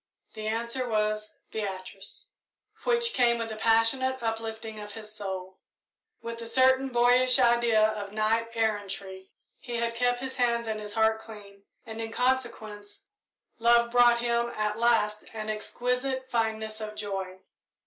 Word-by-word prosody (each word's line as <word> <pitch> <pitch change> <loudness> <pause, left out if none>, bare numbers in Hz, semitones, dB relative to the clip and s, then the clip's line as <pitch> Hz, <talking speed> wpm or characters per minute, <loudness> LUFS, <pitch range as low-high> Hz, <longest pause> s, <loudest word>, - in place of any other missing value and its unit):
The 215 0 -5
answer 235 +3 -2
was 215 -1 0 0.2
"Beatrice," 200 - -6 0.6
which 470 -1 +2
came 240 -2 +3
with 230 -1 -4
a - - -4
passionate 230 +4 +2
uplifting 225 -1 -4
of 210 0 -8
soul. 190 -3 -5 0.6
With 230 0 -6
a 230 - -6
certain 260 +2 +4
boyish 250 +1 +4
idea 235 -3 +4
of 210 -2 -5
knight 220 +2 +1
errantry, 200 -3 -3 0.3
he 240 -2 -6
had 235 0 -1
kept 245 +1 +1
his 265 +1 -6
hands 235 -1 +1
and 220 -1 -3
his 210 0 -7
heart 220 0 +3
clean, 200 -3 -13 0.2
and, 225 0 -6
in 225 0 -5
consequence, 230 -5 -2 0.6
love 235 0 +4
brought 240 -1 +6
to 235 - -3
him 235 0 +1
at 215 0 -1
last 225 -3 +2
an 215 0 -3
exquisite 250 +4 -2
fineness 220 -1 -1
of 215 0 -6
joy. 195 -3 -4
225 Hz, 145 wpm, -28 LUFS, 215-240 Hz, 0.6 s, brought